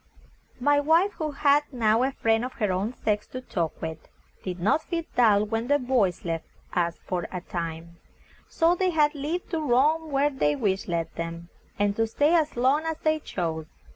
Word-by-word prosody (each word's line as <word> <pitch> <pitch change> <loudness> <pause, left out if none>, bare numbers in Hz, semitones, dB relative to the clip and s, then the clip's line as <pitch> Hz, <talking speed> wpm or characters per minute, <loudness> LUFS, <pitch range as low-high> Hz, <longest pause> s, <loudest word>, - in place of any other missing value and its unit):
My 290 +3 +3
wife, 325 +7 +3
who 310 -1 -1
had 290 0 +3
now 225 -3 +2
a 265 +2 +1
friend 225 -3 +1
of 255 - -4
her 210 -4 -1
own 200 +7 -2
sex 210 -1 -1
to 255 - -6
talk 170 -9 -3
with, 160 -1 -4 0.4
did 180 -1 -4
not 215 - +2
feel 335 0 -3
dull 210 -4 +4
when 225 +2 -2
the 285 +1 +4
boys 245 - 0
left 165 -1 -3 0.3
us 170 -1 0
for 180 -2 -2
a 180 - -3
time, 170 -1 -6 0.5
so 330 +1 +3
they 370 +1 +1
had 305 -3 +3
leave 305 +5 -3
to 330 - -1
roam 305 +4 +2
where 285 +1 +2
their 150 - +1
wish 190 +3 -1
led 165 -2 -2
them, 170 +1 -6 0.3
and 205 0 +1
to 225 0 +2
stay 290 +8 +2
as 315 -6 +2
long 265 +5 +3
as 320 -1 -2
they 310 0 +2
chose. 160 - -4
240 Hz, 195 wpm, -26 LUFS, 180-295 Hz, 0.5 s, dull